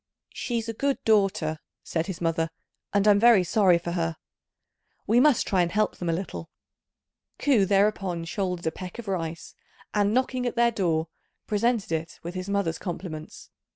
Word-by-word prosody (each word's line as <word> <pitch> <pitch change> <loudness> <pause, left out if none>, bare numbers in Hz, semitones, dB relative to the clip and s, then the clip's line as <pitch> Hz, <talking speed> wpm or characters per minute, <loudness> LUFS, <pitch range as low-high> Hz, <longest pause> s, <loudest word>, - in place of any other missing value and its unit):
"She's 235 -2 -3
a 225 - -3
good 275 +4 0
daughter," 195 -7 +2 0.2
said 165 +1 -2
his 185 -4 -5
mother, 165 -1 0 0.4
"and 200 0 +2
I'm 205 -1 +6
very 230 -4 +6
sorry 180 0 +4
for 170 0 -5
her. 165 -2 -1 0.9
We 230 +3 +4
must 280 -2 +4
try 190 -2 +2
and 170 -1 0
help 210 +2 0
them 175 - -3
a - - +3
little." 165 -1 -4 0.9
Ku 250 -9 +3
thereupon 195 -4 +1
shouldered 180 -1 -3
a 160 - +1
peck 180 +3 -8
of 235 -3 -8
rice, 165 -4 -4 0.4
and, 205 -1 +2
knocking 255 +1 0
at 245 - -3
their 235 0 +4
door, 165 -7 0 0.4
presented 220 -2 0
it 160 0 -3
with 170 +1 -5
his 185 +1 -5
mother's 200 -5 0
compliments. 170 -4 -7
190 Hz, 170 wpm, -26 LUFS, 170-215 Hz, 0.9 s, I'm